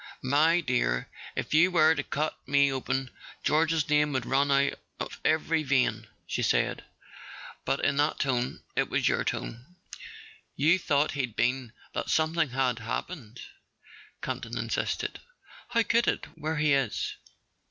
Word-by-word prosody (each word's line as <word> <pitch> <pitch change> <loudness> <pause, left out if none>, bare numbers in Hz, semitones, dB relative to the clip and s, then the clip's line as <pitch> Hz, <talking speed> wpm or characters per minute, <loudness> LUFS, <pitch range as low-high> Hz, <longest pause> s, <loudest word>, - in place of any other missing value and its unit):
"My 155 +6 +4
dear, 125 - 0 0.3
if - - -3
you 160 +4 +6
were 160 -3 +5
to 145 - -1
cut 150 +2 -2
me 140 0 +4
open 130 0 -2 0.3
George's 160 +1 +2
name 150 -1 +3
would 130 -3 -1
run 140 +2 +2
out 140 0 +3 0.3
of - - -5
every 160 +1 +2
vein," 125 -6 +1 0.2
she - - -2
said. - - +1 0.8
"But - - 0
in 140 - +1
that 145 +2 +2
tone—it 125 -2 -1
was - - +1
your - - +2
tone. 125 +10 -5 0.8
You 160 +6 +4
thought 150 -3 +1
he'd 125 -6 -3
been—that 125 0 -2
something 160 -1 +2
had 125 -2 0
happened," 115 +1 -5 0.8
Campton - - -4
insisted. - - -2 0.5
"How 235 -1 +2
could 235 +2 +2
it, - - 0
where 160 0 -3
he 150 -1 +3
is?" 135 -6 0
140 Hz, 140 wpm, -28 LUFS, 130-160 Hz, 0.8 s, you